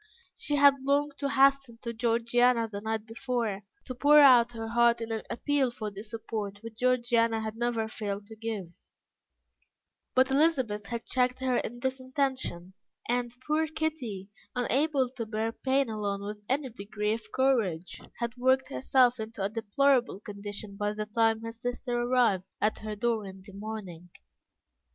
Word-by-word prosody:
She 460 Hz, -11 st, -1 dB
had 280 Hz, -1 st, +6 dB
longed 285 Hz, +2 st, +1 dB
to 280 Hz, -1 st, -1 dB
hasten 275 Hz, -3 st, +3 dB
to 235 Hz, -, -3 dB
Georgiana 235 Hz, +1 st, +2 dB
the 205 Hz, -2 st, -6 dB
night 220 Hz, 0 st, -2 dB
before, 225 Hz, -3 st, -2 dB, 0.2 s
to 255 Hz, -, -5 dB
pour 290 Hz, +4 st, +6 dB
out 245 Hz, -4 st, +7 dB
her 225 Hz, -1 st, -5 dB
heart 235 Hz, 0 st, +4 dB
in 230 Hz, 0 st, -5 dB
an 220 Hz, -1 st, -1 dB
appeal 285 Hz, 0 st, +1 dB
for 215 Hz, -3 st, -5 dB
the 200 Hz, 0 st, -8 dB
support 215 Hz, -2 st, -5 dB
which 225 Hz, 0 st, -9 dB
Georgiana 235 Hz, -2 st, +2 dB
had 220 Hz, 0 st, -4 dB
never 230 Hz, -1 st, -1 dB
failed 205 Hz, -2 st, -4 dB
to 220 Hz, +2 st, -11 dB
give; 215 Hz, -6 st, -5 dB, 1.4 s
but 260 Hz, +1 st, +4 dB
Elizabeth 260 Hz, -9 st, +2 dB
had 235 Hz, +2 st, -4 dB
checked 250 Hz, 0 st, +1 dB
her 255 Hz, -2 st, +1 dB
in 240 Hz, +1 st, -4 dB
this 265 Hz, 0 st, -1 dB
intention; 260 Hz, -9 st, -2 dB, 0.3 s
and, 245 Hz, 0 st, -1 dB
poor 310 Hz, +1 st, +1 dB
Kitty, 270 Hz, -12 st, -4 dB, 0.2 s
unable 265 Hz, +3 st, +1 dB
to 245 Hz, -2 st, -6 dB
bear 220 Hz, +1 st, -1 dB
pain 265 Hz, +3 st, +1 dB
alone 205 Hz, -2 st, -3 dB
with 210 Hz, 0 st, -7 dB
any 265 Hz, 0 st, 0 dB
degree 210 Hz, 0 st, -2 dB
of 215 Hz, -1 st, -7 dB
courage, 220 Hz, -11 st, 0 dB, 0.2 s
had 235 Hz, 0 st, -3 dB
worked 260 Hz, +2 st, +2 dB
herself 255 Hz, -2 st, +3 dB
into 220 Hz, -2 st, -5 dB
a 195 Hz, -, 0 dB
deplorable 235 Hz, +2 st, +1 dB
condition 205 Hz, 0 st, -7 dB
by 205 Hz, 0 st, -1 dB
the 215 Hz, 0 st, -3 dB
time 225 Hz, +1 st, +2 dB
her 230 Hz, 0 st, -5 dB
sister 245 Hz, +1 st, -4 dB
arrived 240 Hz, -7 st, +2 dB
at 215 Hz, +1 st, +1 dB
her 215 Hz, -1 st, -5 dB
door 225 Hz, -1 st, -1 dB
in 190 Hz, 0 st, -11 dB
the 200 Hz, -, -13 dB
morning. 195 Hz, -5 st, -7 dB
230 Hz, 165 wpm, -29 LUFS, 215-260 Hz, 1.4 s, out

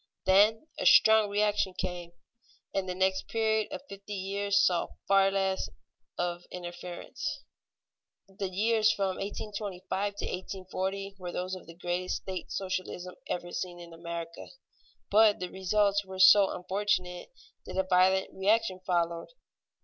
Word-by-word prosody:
Then 210 Hz, +7 st, +5 dB
a -, -, -2 dB
strong 220 Hz, -1 st, +7 dB
reaction 205 Hz, -2 st, +1 dB
came, 175 Hz, -1 st, -4 dB, 0.6 s
and 190 Hz, -1 st, -1 dB
the 180 Hz, -, -2 dB
next 190 Hz, 0 st, +1 dB
period 220 Hz, 0 st, 0 dB
of 285 Hz, -2 st, -6 dB
fifty 200 Hz, +1 st, -8 dB
years 200 Hz, +1 st, 0 dB
saw 175 Hz, -2 st, +2 dB, 0.2 s
far 195 Hz, 0 st, +5 dB
less 195 Hz, -1 st, 0 dB, 0.5 s
of 175 Hz, 0 st, -2 dB
interference. 175 Hz, 0 st, -6 dB, 0.8 s
The 195 Hz, 0 st, -5 dB
years 215 Hz, +3 st, +3 dB
from 195 Hz, -3 st, -1 dB
1825 200 Hz, -1 st, -4 dB
to -, -, -4 dB
1840 190 Hz, +1 st, -4 dB
were 180 Hz, -1 st, -5 dB
those 180 Hz, +1 st, -3 dB
of 185 Hz, -, -7 dB
the 165 Hz, -, -11 dB
greatest 175 Hz, +1 st, -2 dB
state 185 Hz, -1 st, -6 dB
socialism 185 Hz, -1 st, -4 dB
ever 175 Hz, 0 st, -3 dB
seen 175 Hz, -1 st, -4 dB
in 170 Hz, -1 st, -11 dB
America, 170 Hz, 0 st, -7 dB, 0.6 s
but 215 Hz, 0 st, +5 dB
the 180 Hz, -1 st, -5 dB
results 200 Hz, +2 st, +2 dB
were 190 Hz, -1 st, -9 dB
so 190 Hz, +1 st, +8 dB
unfortunate 180 Hz, -1 st, -2 dB, 0.4 s
that -, -, -6 dB
a 190 Hz, -, +3 dB
violent 185 Hz, +1 st, +3 dB
reaction 200 Hz, 0 st, +1 dB
followed. 170 Hz, -2 st, 0 dB
190 Hz, 135 wpm, -29 LUFS, 180-200 Hz, 0.8 s, so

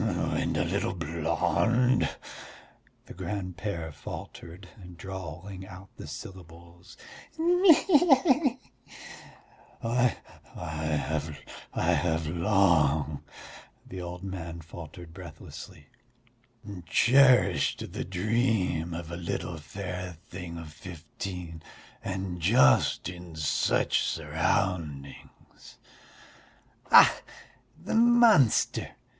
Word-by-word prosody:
"And -, -, -1 dB
a -, -, +1 dB
little -, -, -1 dB
blonde?" 115 Hz, -, +1 dB, 1.0 s
the -, -, -11 dB
grand 90 Hz, 0 st, -5 dB
père 85 Hz, -7 st, -4 dB
faltered, 90 Hz, +5 st, -9 dB, 0.3 s
drawling 95 Hz, +1 st, -8 dB
out 95 Hz, +1 st, -12 dB
the -, -, -9 dB
syllables. 85 Hz, +3 st, -11 dB, 0.4 s
"He 355 Hz, +3 st, +5 dB
he 320 Hz, +1 st, +5 dB
he!" 270 Hz, -4 st, +3 dB, 1.2 s
"I... 120 Hz, +1 st, +2 dB, 0.4 s
have 80 Hz, -1 st, -2 dB
long... 75 Hz, -2 st, -8 dB, 0.4 s
I -, -, +2 dB
have 80 Hz, +1 st, 0 dB
long," 80 Hz, -5 st, +2 dB, 0.6 s
the 95 Hz, -1 st, -8 dB
old 90 Hz, +1 st, -7 dB
man 85 Hz, -3 st, -6 dB
faltered 80 Hz, +1 st, -11 dB
breathlessly, 85 Hz, -3 st, -11 dB, 1.0 s
"cherished 130 Hz, +4 st, +4 dB
the -, -, -3 dB
dream 95 Hz, -4 st, 0 dB
of 85 Hz, -1 st, -7 dB
a -, -, -4 dB
little 85 Hz, -1 st, -4 dB
fair 90 Hz, +3 st, -6 dB, 0.2 s
thing 90 Hz, -2 st, -7 dB
of 80 Hz, -2 st, -9 dB
fifteen 85 Hz, 0 st, -8 dB, 0.4 s
and 95 Hz, -2 st, -4 dB
just 115 Hz, +10 st, +4 dB
in 90 Hz, -2 st, -9 dB
such 80 Hz, -2 st, +1 dB
surroundings." 80 Hz, -8 st, -3 dB, 1.1 s
"Ach, -, -, +7 dB, 0.6 s
the -, -, -5 dB
monster!" 230 Hz, -, +4 dB
90 Hz, 90 wpm, -28 LUFS, 80-105 Hz, 1.2 s, Ach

